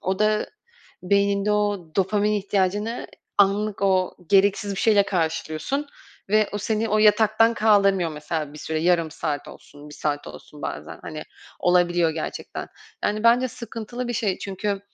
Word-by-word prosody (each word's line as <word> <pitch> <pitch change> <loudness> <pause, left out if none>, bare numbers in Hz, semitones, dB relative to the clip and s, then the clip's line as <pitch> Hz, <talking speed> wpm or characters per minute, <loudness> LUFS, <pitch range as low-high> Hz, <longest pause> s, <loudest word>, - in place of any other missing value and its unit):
o 190 +1 -1
da 215 0 +2 0.6
beyninde 200 +2 +2
o 205 -5 -1
dopamin 205 +2 +2
ihtiyacını 205 +2 -1 0.3
anlık 200 +1 +2
o 185 -2 +2
gereksiz 200 0 +3
bir - - -3
şeyle 210 -3 +5
karşılıyorsun. 170 - -2 0.4
Ve 215 +1 +3
o 205 - -2
seni 220 +2 -1
o 215 - +2
yataktan 215 +2 +4
kaldırmıyor 200 -5 +3
mesela 150 0 -4
bir 150 - -11
süre. 160 +1 -3
Yarım 170 -1 +2
saat 150 -2 -4
olsun, 145 +1 -13
1 150 - -11
saat 145 -1 -2
olsun 150 -1 -12
bazen, - - -6
hani, 155 -1 -6 0.4
olabiliyor 175 -2 +3
gerçekten. 160 0 -5 0.4
Yani, 210 +1 0
bence 245 +2 +5
sıkıntılı 235 +1 -6
bir 240 - -1
şey 210 -4 -1
çünkü, 200 +1 -3
200 Hz, 150 wpm, -24 LUFS, 175-215 Hz, 0.6 s, şeyle